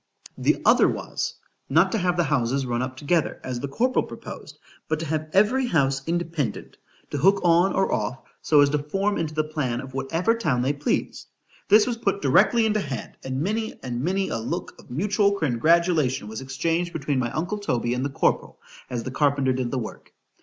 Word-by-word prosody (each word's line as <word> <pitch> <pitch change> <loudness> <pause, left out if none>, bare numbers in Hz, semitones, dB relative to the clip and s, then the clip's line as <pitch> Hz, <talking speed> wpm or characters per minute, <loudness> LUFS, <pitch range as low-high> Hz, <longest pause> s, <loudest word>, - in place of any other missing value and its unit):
_ - - -7
The - - +3
other - - +6
was, - - -3 0.3
not 165 +7 +4
to 225 - 0
have 180 -1 0
the 175 - +3
houses 135 -2 0
run 120 -1 -1
up 130 0 -4
together, 155 +3 0
as 125 -2 -4
the 140 - -3
corporal 250 - +1
proposed, - - -9 0.3
but 155 - -1
to - - -3
have 155 0 -2
every 235 +8 +3
house 135 - +1
independent, 165 -8 -3 0.3
to 145 - -2
hook 195 +7 +4
on, 175 +2 +4
or 195 - +1
off, 110 +4 -1 0.2
so 150 -2 +4
as 140 0 +4
to 150 - +1
form 195 +8 -1
into 155 -2 -3
the 155 - +2
plan 150 -6 -2
of 130 0 -8
whatever 165 +10 0
town 155 - 0
they 135 +3 +1
pleased. 145 +1 -2 0.4
This 210 0 +6
was 240 -2 -2
put 200 -3 0
directly 220 - +4
into 215 -1 +1
hand, 135 - -5
and 130 +1 -3
many 220 +5 -2
and 120 -1 -3
many 190 +5 0
a 115 - -2
look 165 +11 -4
of - - -17
mutual 200 - +1
congratulation 155 - +2
was 110 +3 -6
exchanged 165 +6 -1
between 145 -3 -1
my 120 -2 0
uncle 180 +7 -2
Toby 120 - -1
and 125 +1 -2
the 140 - -1
corporal, 135 - 0 0.3
as 120 -2 -3
the 130 - -5
carpenter 140 -2 +2
did 125 -1 -2
the 130 - -2
work. 115 -3 -7
155 Hz, 205 wpm, -24 LUFS, 130-185 Hz, 0.4 s, other